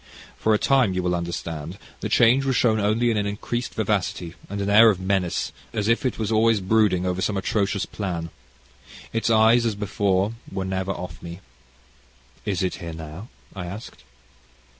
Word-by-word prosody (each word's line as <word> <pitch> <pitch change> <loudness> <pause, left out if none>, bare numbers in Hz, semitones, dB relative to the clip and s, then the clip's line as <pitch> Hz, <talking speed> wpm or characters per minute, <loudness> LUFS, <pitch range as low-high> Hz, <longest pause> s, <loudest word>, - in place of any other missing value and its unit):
"For 110 -1 +2
a - - +3
time, 125 -6 +3
you 90 - -1
will 90 0 +1
understand, 85 -1 -4 0.2
the - - -3
change 125 +3 +5
was 135 -2 0
shown 110 -3 +3
only 110 +4 +2
in 110 - 0
an 100 -1 0
increased 120 +4 -4
vivacity, 95 -5 -1 0.2
and 100 +1 -4
an 100 - -1
air 110 +3 +7
of 100 -4 +1
menace, 95 -2 -1 0.2
as 105 -1 -1
if 115 +3 +2
it 125 - -3
were 110 - -1
always 110 0 +4
brooding 95 -2 +2
over 90 0 -1
some 100 +1 0
atrocious 100 0 0
plan. 85 -5 -4 0.8
Its 115 0 0
eyes, 115 +1 +5
as 115 -3 0
before, 100 0 0 0.2
were 95 - -3
never 95 0 -2
off 90 -1 -7
me." 85 +1 -8 1.1
"Is 95 -4 -1
it 90 - 0
here 85 -2 -7
now?" 80 +6 -8 0.3
I 90 -2 -5
asked. 100 +6 -9
100 Hz, 180 wpm, -24 LUFS, 90-110 Hz, 1.1 s, air